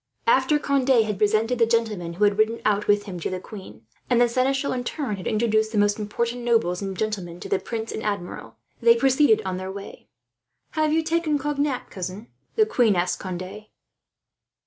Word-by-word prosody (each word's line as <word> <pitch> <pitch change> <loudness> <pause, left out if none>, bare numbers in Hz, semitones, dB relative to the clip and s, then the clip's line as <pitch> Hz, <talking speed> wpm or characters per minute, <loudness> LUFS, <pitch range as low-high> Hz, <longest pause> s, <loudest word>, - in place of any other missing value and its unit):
After 465 -10 +4
Conde 270 -5 +2
had 210 -3 -3
presented 220 +3 +2
the 230 - +4
gentlemen 220 -7 0
who 190 +5 -1
had 205 0 +3
ridden 225 +2 +2
out 210 -1 +1
with 205 0 +3
him 190 -4 -7
to - - -3
the 185 - -3
queen, 190 - -11 0.2
and 245 -2 +3
the 240 - +5
seneschal 270 +3 0
in 250 -1 -3
turn 245 -6 -3
had 185 - -6
introduced 220 0 +1
the 220 - -2
most 205 +1 +2
important 235 +3 -2
nobles 225 -7 +1
and 195 -1 -4
gentlemen 190 -6 -3
to - - -7
the - - +1
prince 225 -1 -5
and - - -5
Admiral, 200 -5 -4 0.3
they 465 0 +6
proceeded 265 - +3
on 185 -1 -2
their 185 +1 -5
way. 200 0 -10 0.6
"Have 310 -1 +1
you 320 +1 +2
taken 325 -2 +1
Cognac, 285 -2 -2
cousin?" 190 +4 -6 0.3
the 435 - +4
queen 240 - +2
asked 175 +1 0
Conde. 185 +3 -7
220 Hz, 190 wpm, -24 LUFS, 200-255 Hz, 0.6 s, they